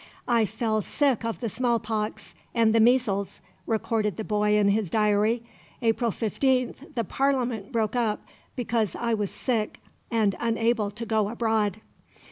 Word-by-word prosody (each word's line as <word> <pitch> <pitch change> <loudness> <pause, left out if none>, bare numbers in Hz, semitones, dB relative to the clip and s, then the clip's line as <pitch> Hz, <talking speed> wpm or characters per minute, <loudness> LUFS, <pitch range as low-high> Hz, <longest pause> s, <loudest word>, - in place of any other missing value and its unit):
"I 235 -2 +3
fell 220 +1 -1
sick 270 +1 +1
of 230 +1 -3
the 235 - -1
smallpox 225 -2 -2 0.2
and 225 -2 +4
the 230 - +4
measles," 220 -5 +2 0.3
recorded 220 -1 0
the 220 - -3
boy 210 0 +2
in 205 -1 +4
his 205 -2 +1
diary. 215 +3 +2 0.4
"April 230 +1 +2
15th 260 - -1
the 230 - +1
Parliament 250 -3 0
broke 225 -2 0
up 225 -4 +1 0.4
because 225 -5 -1
I 235 -1 -1
was 210 -3 0
sick 225 -5 -2 0.3
and 220 -4 +2
unable 230 -2 +1
to 215 +3 -7
go 215 -2 +1
abroad." 220 -3 0
225 Hz, 145 wpm, -26 LUFS, 210-235 Hz, 0.4 s, and